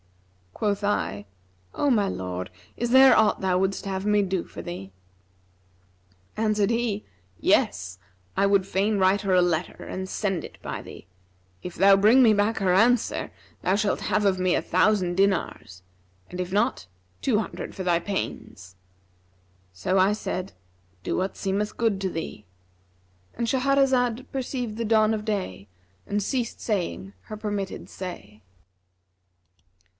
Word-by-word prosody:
Quoth 205 -1 -1
I, 100 - -1 0.5
'O 290 - +1
my 210 -5 +3
lord, 90 - -4 0.3
is 240 - -1
there 265 0 +8
aught 220 -1 +3
thou 185 -1 +2
wouldst 190 +1 -1
have 190 0 -3
me 210 0 +3
do 190 -2 -1
for - - -9
thee?' 135 - -7 1.5
Answered 215 -2 +1
he, 230 -3 -1 0.4
'Yes, 90 +2 +1 0.4
I - - +4
would 200 -1 +3
fain 200 +3 +1
write 190 +1 +3
her 195 -2 0
a 180 - +5
letter 175 -1 0
and 190 0 -5
send 190 -4 -2
it - - -9
to - - -25
her - - -33
by - - -5
thee. - - -12 0.6
If 180 - -7
thou 195 +1 +6
bring 220 +7 +6
me 225 -4 +6
back 210 +2 +1
her 185 -2 +2
answer, 230 +5 +2 0.3
thou 185 - +2
shalt 205 0 0
have 210 - 0
of 190 -2 +2
me 185 -1 +2
a - - +1
thousand 185 -2 +2
dinars; 190 - 0 0.5
and 180 - -7
if 180 0 -3
not, 195 - 0 0.3
two 230 -6 +2
hundred 220 - -5
for 190 - -5
thy 175 -2 +3
pains.' 95 - -5 1.0
So 90 - -1
I 190 +2 +4
said, 185 -3 -4 0.5
'Do - - -2
what 190 +1 -2
seemeth 200 +2 -2
good 225 -4 +1
to 190 - 0
thee;'—And 90 - -9
Shahrazad 260 -1 +1
perceived 250 -4 -3
the 230 - -2
dawn 215 0 +3
of 210 -1 -3
day 145 - -3 0.4
and 205 0 -1
ceased 240 +2 -2
saying 170 - -3
her 215 - -8
permitted 205 -2 -4
say. 110 - -8
195 Hz, 150 wpm, -25 LUFS, 180-215 Hz, 1.5 s, there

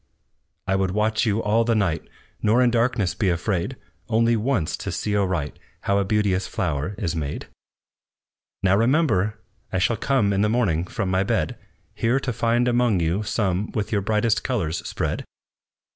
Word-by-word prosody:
"I 95 - +1
would 95 -1 +1
watch 110 +3 +1
you 110 +1 +1
all 110 +2 +3
the 115 0 +1
night, 90 -7 +1 0.4
Nor 115 +4 +4
in 120 - +3
darkness 115 -5 +1
be 100 - 0
afraid, 90 +7 -1 0.3
Only 115 +1 +3
once 110 - 0
to - - -4
see 105 - -2
aright 95 -7 -1 0.2
How 100 0 +1
a - - +2
beauteous 100 -2 +1
flower 75 +8 -2
is 90 -6 -2
made. 75 -3 -4 1.2
"Now 95 0 +4
remember! 115 - +2 0.3
I - - 0
shall 100 +5 +1
come 115 -8 +1
In 100 - +1
the 105 - +2
morning 95 -8 +1
from 95 +1 -3
my 95 0 +2
bed, 95 -6 0 0.4
Here 120 +4 +1
to 135 -2 -3
find 120 +2 +1
among 120 -5 +2
you 85 +5 0
some 105 -2 -1
With 105 -2 -2
your 105 -2 +1
brightest 110 +2 +1
colors 90 -11 -1
spread!" - - -2
105 Hz, 170 wpm, -23 LUFS, 95-115 Hz, 1.2 s, Nor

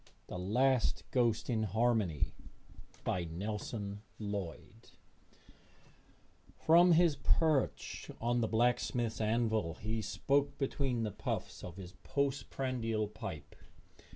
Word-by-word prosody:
The 90 - -6
Last 125 +7 +2
Ghost 120 -4 +2
in 115 -3 +1
Harmony 110 - +1 0.7
BY 90 -1 0
NELSON 100 +3 -4 0.2
LLOYD 100 -6 -6 1.7
From 170 +2 +6
his 165 -3 +4
perch 155 -2 +1
on 120 +1 +1
the 110 - +1
blacksmith's 120 0 +1
anvil 110 -6 +1
he 110 +2 -3
spoke 140 +6 +1
between 135 -3 0
the 105 - -1
puffs - - -4
of 85 - -7
his 90 -2 -8
post 140 -1 -1
prandial 115 -5 -1
pipe. 80 -8 -7
115 Hz, 105 wpm, -34 LUFS, 100-130 Hz, 1.7 s, From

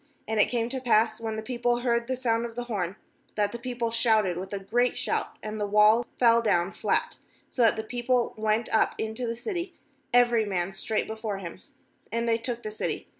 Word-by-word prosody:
And 220 0 -1
it - - +5
came 235 -2 0
to 260 0 -4
pass, 220 -2 +3
when 220 -1 -3
the 220 - -4
people 240 +1 0
heard 235 -1 +1
the 260 - -1
sound 235 -2 0
of 230 - -13
the 245 - -3
horn, 200 -6 -3 0.4
that 205 -1 +1
the 235 - -6
people 240 -2 -3
shouted 220 -5 +3
with 190 +2 -6
a 200 - -2
great 240 +6 0
shout, - - -2
and 215 0 -4
the 205 - 0
wall 210 +3 +5
fell 235 -1 +5
down 195 -4 +1
flat, - - 0 0.3
so 255 - -1
that 225 -2 +5
the 220 - -3
people 245 +2 0
went 220 +1 0
up 220 - +3
into 220 +3 -3
the 230 - -2
city, 350 - -4 0.4
every 240 -2 +4
nrm.n 190 -2 -2
straight 215 +3 -1
before 220 -2 -4
him, 175 -4 -8 0.5
and 235 0 -1
they 230 0 +2
took 240 0 -4
the 215 - -4
city. 215 - -4
230 Hz, 215 wpm, -27 LUFS, 215-240 Hz, 0.5 s, it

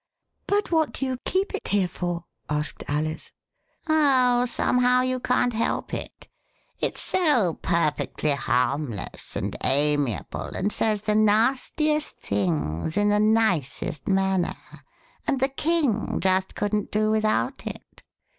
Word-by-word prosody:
But 405 -1 0
what 320 -2 +2
do 270 - -2
you 260 -1 -2
keep 385 +3 0
it 405 - -4
here 195 -2 +2
for? 175 0 -4
" - - -46
asked 150 -1 -4
Alice. 155 +2 -2 0.3
*' - - -40
Oh, 260 -6 +4
somehow 250 +1 +2
you 255 0 -1
can't 245 0 +1
help 225 +1 -1
it; - - -7 0.5
it - - -1
s - - -3
so 290 - +2
perfectly 155 -2 0
harmless 130 -4 -2
and - - -3
amiable 145 -3 0
and 205 +2 0
says 215 -2 0
the 215 - +1
nastiest 255 +8 +2
things 85 - -1
in 205 0 +3
the 210 0 +3
nicest 210 - +1
manner, 190 -2 +1 0.7
and 270 - +1
the 265 +1 +2
King 285 -6 0
just 190 0 +1
couldn't 210 0 -1
do 215 0 +1
without 215 0 0
it. - - -9
210 Hz, 135 wpm, -25 LUFS, 155-255 Hz, 0.7 s, Oh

